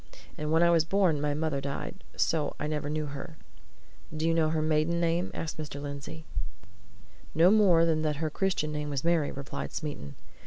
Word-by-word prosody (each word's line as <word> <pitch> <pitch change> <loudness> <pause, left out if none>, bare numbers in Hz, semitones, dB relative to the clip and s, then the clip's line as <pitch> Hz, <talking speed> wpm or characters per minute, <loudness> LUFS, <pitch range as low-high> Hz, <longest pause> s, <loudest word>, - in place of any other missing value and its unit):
And 150 0 -3
when 165 +1 +5
I 170 - +5
was 165 -2 +5
born, 170 -4 +2
my 145 -1 0
mother 155 -2 -1
died. 140 +7 -5
So 155 -3 +1
I - - -2
never 150 -1 -2
saw 155 0 -1
her." 145 +3 -7 0.8
"Do 160 +1 0
you 165 - +3
know 160 -1 +3
her 155 -1 0
maiden 155 +2 +2
name?" 170 +1 +1
asked 160 -1 -5
Mr. 145 -2 -5
Lindsey. 145 +2 -7 1.1
"No 170 +4 +6
more 190 -6 +6
than 160 -2 +2
that 155 -1 0
her 155 +1 -2
Christian 180 -4 0
name 150 0 -3
was 140 -2 -2
Mary," 165 -3 +2
replied 140 0 -6
Smeaton. 145 - -5
155 Hz, 190 wpm, -29 LUFS, 150-165 Hz, 1.1 s, No